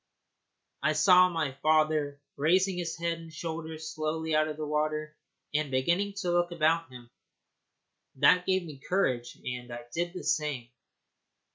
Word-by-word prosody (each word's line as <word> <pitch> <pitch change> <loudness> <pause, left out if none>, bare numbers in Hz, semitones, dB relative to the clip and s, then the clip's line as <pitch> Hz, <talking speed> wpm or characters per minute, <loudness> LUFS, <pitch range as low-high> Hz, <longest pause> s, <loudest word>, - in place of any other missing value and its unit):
I 155 - +2
saw 180 +3 +6
my 160 -5 -1
father 155 -2 +2 0.2
raising 185 +6 +2
his 170 -1 -3
head 170 0 -2
and 165 -1 -11
shoulders 160 -1 -6
slowly 160 +1 -2
out 155 0 +3
of 155 -1 -5
the 155 - -3
water 155 0 -1 0.4
and 150 -1 0
beginning 170 +10 +1
to 180 -3 -1
look 175 0 +2
about 165 -1 +1
him. 120 -1 -12 1.0
That 180 +6 +4
gave 190 -1 +2
me 150 -5 -10
courage, 130 -9 -1
and 125 -1 -5
I 120 0 -6
did 175 +1 -2
the - - -5
same. 145 -6 -1
155 Hz, 150 wpm, -29 LUFS, 150-170 Hz, 1.0 s, saw